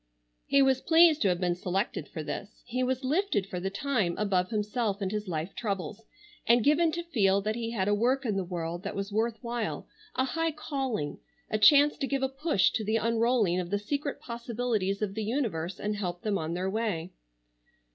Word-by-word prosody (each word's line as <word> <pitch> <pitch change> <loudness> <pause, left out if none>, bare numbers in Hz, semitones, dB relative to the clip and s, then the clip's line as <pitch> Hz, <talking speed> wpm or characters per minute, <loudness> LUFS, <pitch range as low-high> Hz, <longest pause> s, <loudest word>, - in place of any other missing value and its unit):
He 275 0 +5
was 265 -1 +3
pleased 325 -1 +5
to 205 - +4
have 180 -2 +1
been 180 -1 +1
selected 180 -2 -2
for 155 - -6
this; 200 +8 -7
he 250 +1 -2
was 255 +1 0
lifted 305 - +1
for 185 -2 -5
the 190 +2 -2
time 210 -5 0
above 190 -3 +1
himself 210 -1 -1
and 195 -2 -2
his 210 -1 -3
life 165 +1 -3
troubles, 200 -3 -3 0.5
and 235 0 +5
given 320 +4 +4
to 345 - -2
feel 200 - +2
that 215 +2 -1
he 230 0 -3
had 200 -5 -1
a 205 - +3
work 255 +6 +1
in 215 -4 0
the 195 - 0
world 170 -1 -4
that 200 - -5
was 200 +1 -3
worth 225 +2 0
while, 235 -2 -3 0.3
a 260 - +2
high 325 +4 -1
calling, 265 - -3 0.3
a 215 - +1
chance 290 +6 +6
to 275 - -1
give 275 -1 -1
a 265 - +1
push 270 - +2
to 220 - -2
the 220 +2 +1
unrolling 230 -4 +2
of 175 -1 -4
the 205 - +1
secret 280 +7 -3
possibilities 235 -4 -2
of 200 -2 -2
the 220 +1 -3
universe 205 - -2
and 210 0 -2
help 180 -3 -4
them 210 -2 0
on 160 +2 -3
their 185 +1 -1
way. 190 -5 -2
215 Hz, 205 wpm, -29 LUFS, 190-255 Hz, 0.5 s, chance